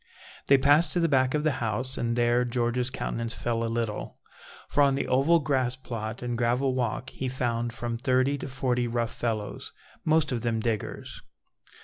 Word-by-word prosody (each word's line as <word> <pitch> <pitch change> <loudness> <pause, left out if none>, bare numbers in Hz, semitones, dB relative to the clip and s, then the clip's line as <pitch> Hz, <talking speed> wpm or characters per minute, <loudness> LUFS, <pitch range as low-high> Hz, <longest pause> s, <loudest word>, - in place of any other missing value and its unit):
They 140 - +7
passed 145 +5 +4
to 175 - +1
the 165 - +3
back 130 -2 +2
of 150 - 0
the 155 - +3
house, 120 +4 -1
and 115 0 -1
there 120 0 +3
George's 120 0 0
countenance 115 -3 -3
fell 115 -1 -1
a 115 - -1
little, 115 -2 -3 0.5
for 145 - +1
on 140 -1 +4
the 140 - -2
oval 140 +7 +4
grass 130 -5 0
plot 115 -2 -6
and 120 -1 -2
gravel 125 +3 +1
walk 125 +1 -2
he 130 - -3
found 120 -2 -1
from 115 0 -4
thirty 130 +2 +2
to - - -5
forty 125 -2 0
rough 115 -1 -1
fellows, 110 -4 -3 0.3
most 155 -2 +2
of 120 -2 -1
them 115 -2 0
diggers. 110 -2 -3
125 Hz, 185 wpm, -27 LUFS, 115-135 Hz, 0.5 s, They